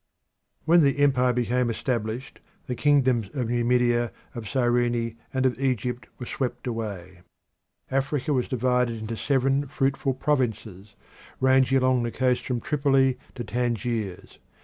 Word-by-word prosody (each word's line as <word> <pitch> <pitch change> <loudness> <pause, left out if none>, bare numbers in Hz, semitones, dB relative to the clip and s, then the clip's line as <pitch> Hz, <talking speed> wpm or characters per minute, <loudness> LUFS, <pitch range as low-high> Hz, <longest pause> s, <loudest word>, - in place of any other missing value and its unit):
When 170 +2 +6
the 140 -1 +3
empire 130 -3 +3
became 125 0 0
established 115 +1 -3 0.3
the 125 - -3
kingdoms 130 -6 +2
of 125 -4 -1
Numidia, 120 -1 +2 0.2
of 110 -4 -6
Cyrene, 120 -2 +1 0.2
and 130 0 0
of 130 -1 +1
Egypt 125 -3 -1
were 125 - -6
swept 125 0 -4
away. 100 -7 -5 0.7
Africa 135 +2 0
was 125 -2 0
divided 125 -1 +1
into 110 +1 -5
seven 135 +3 +1
fruitful 135 -1 0
provinces 110 -8 -2 0.4
ranging 130 0 +4
along 130 -1 +2
the 120 0 -2
coast 125 0 +1
from 125 -3 -1
Tripoli 135 -3 +2 0.2
to 120 - -4
Tangiers. 115 -4 -3
125 Hz, 130 wpm, -25 LUFS, 115-135 Hz, 0.7 s, When